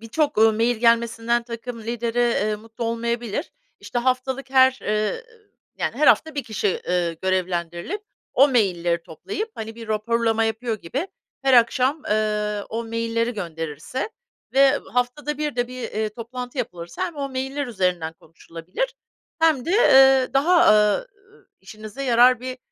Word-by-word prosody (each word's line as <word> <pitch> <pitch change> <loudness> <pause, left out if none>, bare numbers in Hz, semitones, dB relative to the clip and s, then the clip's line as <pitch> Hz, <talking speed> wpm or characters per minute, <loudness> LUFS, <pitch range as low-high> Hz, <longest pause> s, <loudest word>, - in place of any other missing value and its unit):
birçok, 260 +3 -1
ııı, 220 0 +6
mail 230 +2 +1
gelmesinden 235 0 +2
takım 235 0 -7
lideri, 235 +1 -3
eee, 215 -3 +1
mutlu 225 +2 -8
olmayabilir. 235 - -2 0.3
İşte 245 - -3
haftalık 260 +2 -1
her, 260 0 +5
ııı, 215 - -1 0.6
yani, - - -2
her - - +2
hafta 315 -1 +4
bir 285 - -2
kişi, 210 -3 -1
ııı, 175 -2 0
görevlendirilip 185 - -2 0.3
o 275 +2 +6
mailleri 175 -8 +1
toplayıp, 370 - -6
hani, 225 0 -6
bir 230 -1 -10
raporlama 225 +1 +1
yapıyor 225 +1 -2
gibi 275 - -3 0.3
her 270 -1 +4
akşam, 255 +5 +3
ııı, 210 -1 -1
o 230 +1 -4
mailleri 230 +1 -1
gönderirse 165 - -5 0.4
ve 275 +1 +5
haftada 275 +4 -1
bir 295 -4 -2
de 245 0 0
bir, 255 0 -7
eee, 215 -1 -2
toplantı 245 +4 -7
yapılırsa 175 -8 -4
hem 335 -4 -9
o 280 -1 -3
mailler 265 +2 -3
üzerinden 180 -7 -1
konuşulabilir 165 - -6 0.5
hem 310 -6 +3
de, - - -3
eee, 270 - +6
daha, 335 +6 +5
ııı, 210 - +3 0.5
işinize 215 +6 -9
yarar 245 -1 +5
bir 255 0 -6
235 Hz, 145 wpm, -23 LUFS, 210-260 Hz, 0.6 s, ııı